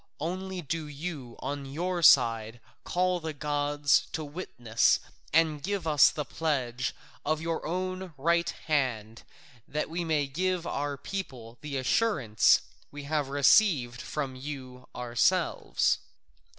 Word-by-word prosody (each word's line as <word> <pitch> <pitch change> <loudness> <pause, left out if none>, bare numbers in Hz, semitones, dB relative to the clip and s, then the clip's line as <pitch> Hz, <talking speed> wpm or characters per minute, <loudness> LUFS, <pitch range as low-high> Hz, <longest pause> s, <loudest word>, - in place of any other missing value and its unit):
Only 185 +3 -4
do 155 +2 -3
you 145 -5 -6
on 140 0 -4
your 175 +5 -2
side 115 -6 +5 0.2
call 180 0 +1
the 160 -1 -5
gods 145 0 +1
to 155 0 -3
witness 125 -8 +1 0.3
and 155 -1 +3
give 195 +1 -2
us 150 -3 +6
the 150 - -4
pledge 130 -6 -2 0.3
of 155 +1 0
your 165 0 -3
own 185 +1 -3
right 170 +4 +2
hand, 120 -8 -2 0.5
that 150 +2 -3
we 170 +1 -2
may 155 -3 +1
give 180 +5 -1
our 145 -2 -2
people 130 -10 -6
the 145 -2 -4
assurance 130 - +3 0.3
we 145 0 -8
have 145 -1 -1
received 140 - +4
from 135 0 -4
you 130 -2 -8
ourselves." 125 - +1
150 Hz, 125 wpm, -29 LUFS, 130-170 Hz, 0.5 s, us